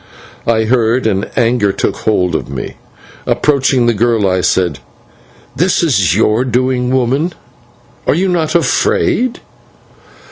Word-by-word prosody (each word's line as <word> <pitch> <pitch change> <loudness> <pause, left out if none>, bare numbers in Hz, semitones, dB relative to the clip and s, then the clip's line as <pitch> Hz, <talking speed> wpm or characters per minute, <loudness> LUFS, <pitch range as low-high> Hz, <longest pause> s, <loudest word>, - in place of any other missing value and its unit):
I 110 -1 +2
heard, 120 +1 +1
and 100 -3 -1
anger 115 -4 +2
took - - -2
hold 90 -5 0
of 80 - -3
me. 70 - -6 0.5
Approaching 135 -4 +2
the 120 - +3
girl, 115 -2 +1
I 90 -1 +1
said: 90 -7 0 0.8
"This 175 +4 +1
is 100 - +2
your 110 +2 +2
doing, 125 0 0
woman! 130 +7 0 0.7
Are - - +3
you 185 +4 +1
not 170 -4 -1
afraid?" 235 +8 +1
120 Hz, 130 wpm, -14 LUFS, 105-135 Hz, 0.8 s, the